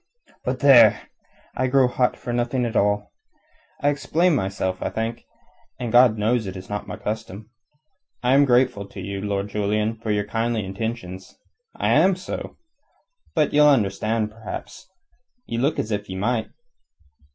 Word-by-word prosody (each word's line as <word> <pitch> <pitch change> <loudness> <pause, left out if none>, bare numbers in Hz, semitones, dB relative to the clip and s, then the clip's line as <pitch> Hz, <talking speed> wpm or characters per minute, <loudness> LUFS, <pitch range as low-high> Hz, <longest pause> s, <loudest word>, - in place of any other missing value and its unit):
"But 125 0 -3
there! 120 -6 +6 0.5
I 130 - 0
grow 130 0 +4
hot 125 0 0
for 120 - -5
nothing 120 +1 0
at 115 0 -4
all. 105 0 +1 0.7
I 145 - +4
explain 160 +5 +1
myself, 95 -5 -2
I - - -1
think, 115 +1 -4 0.5
and 120 -3 -3
God 120 -2 +6
knows, 110 +1 0
it 95 0 -6
is 95 +2 -10
not 105 - -4
my - - -6
custom. 110 0 -6 0.7
I 125 +1 +3
am 140 +1 +6
grateful 125 -5 +2
to 100 - -11
you, 100 +1 -5
Lord 100 0 -2
Julian, 105 +2 0
for 110 0 -7
your 105 -1 +1
kindly 115 0 -1
intentions. 95 -2 -6 0.4
I - - -1
am 190 0 +4
so. 185 - -7 0.8
But 155 -3 +2
ye'll 150 0 +6
understand, 110 -2 +1
perhaps. 110 - -9 0.6
Ye 115 - -3
look 140 +5 +1
as 110 - -3
if 105 -1 -3
ye 95 - -5
might." 110 +4 -1
110 Hz, 160 wpm, -23 LUFS, 105-125 Hz, 0.8 s, there